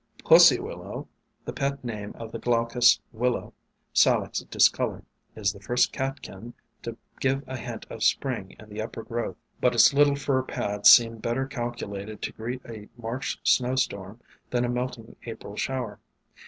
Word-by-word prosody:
PussyWillow, -, -, +4 dB, 0.4 s
the -, -, -5 dB
pet 140 Hz, 0 st, -2 dB
name 105 Hz, -4 st, -5 dB
of 115 Hz, -1 st, -8 dB
the -, -, -6 dB
Glaucous 120 Hz, 0 st, +3 dB
Wil 125 Hz, +2 st, +1 dB
low, -, -, -6 dB, 0.4 s
Salix -, -, +3 dB
discolor, -, -, +1 dB, 0.3 s
is 100 Hz, -2 st, 0 dB
the 100 Hz, -, -13 dB
first 120 Hz, +5 st, +1 dB
catkin 130 Hz, -5 st, -5 dB, 0.3 s
to 115 Hz, -1 st, -6 dB, 0.2 s
give 135 Hz, +1 st, 0 dB
a 130 Hz, -, -5 dB
hint 120 Hz, -2 st, -7 dB
of 115 Hz, -, -9 dB
Spring 115 Hz, -4 st, 0 dB
in 110 Hz, -, -13 dB
the 105 Hz, +1 st, -5 dB
uppergrowth, 115 Hz, +1 st, -4 dB, 0.2 s
but 125 Hz, -1 st, +2 dB
its 120 Hz, -, +7 dB
little 145 Hz, 0 st, +4 dB
fur 135 Hz, -2 st, 0 dB
pads 105 Hz, -5 st, +2 dB
seem 115 Hz, -2 st, +7 dB
better 120 Hz, +4 st, -1 dB
calculated 110 Hz, -5 st, -5 dB
to -, -, -3 dB
greet 120 Hz, +3 st, -5 dB
a 110 Hz, -3 st, -9 dB
March 120 Hz, +3 st, -4 dB
snowstorm 120 Hz, -5 st, 0 dB, 0.3 s
than 125 Hz, 0 st, +1 dB
a -, -, -2 dB
melting 125 Hz, -2 st, -4 dB
April 110 Hz, -3 st, -8 dB
shower. 120 Hz, -4 st, -3 dB
120 Hz, 155 wpm, -26 LUFS, 110-130 Hz, 0.4 s, its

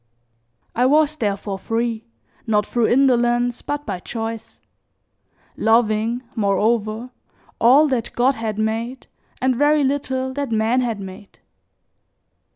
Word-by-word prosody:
I 245 Hz, +2 st, +2 dB
was 305 Hz, +2 st, +3 dB
therefore 200 Hz, -5 st, -3 dB
free, 230 Hz, +1 st, -2 dB, 0.4 s
not 210 Hz, -2 st, +2 dB
through 235 Hz, 0 st, +1 dB
indolence 245 Hz, -2 st, +2 dB
but 290 Hz, 0 st, -4 dB
by 190 Hz, -4 st, -4 dB
choice; 225 Hz, +2 st, -6 dB, 1.0 s
loving, 225 Hz, +1 st, +1 dB
moreover, 220 Hz, +3 st, 0 dB, 0.5 s
all 270 Hz, +7 st, +6 dB
that 245 Hz, -4 st, -1 dB
God 255 Hz, +3 st, +3 dB
had 225 Hz, -4 st, -4 dB
made 225 Hz, +4 st, -2 dB, 0.4 s
and 260 Hz, -1 st, +2 dB
very 290 Hz, +3 st, +3 dB
little 265 Hz, -1 st, -1 dB
that 280 Hz, -2 st, -3 dB
man 225 Hz, +3 st, +2 dB
had 230 Hz, -4 st, -2 dB
made. 195 Hz, +1 st, -10 dB
235 Hz, 115 wpm, -21 LUFS, 220-260 Hz, 1.0 s, all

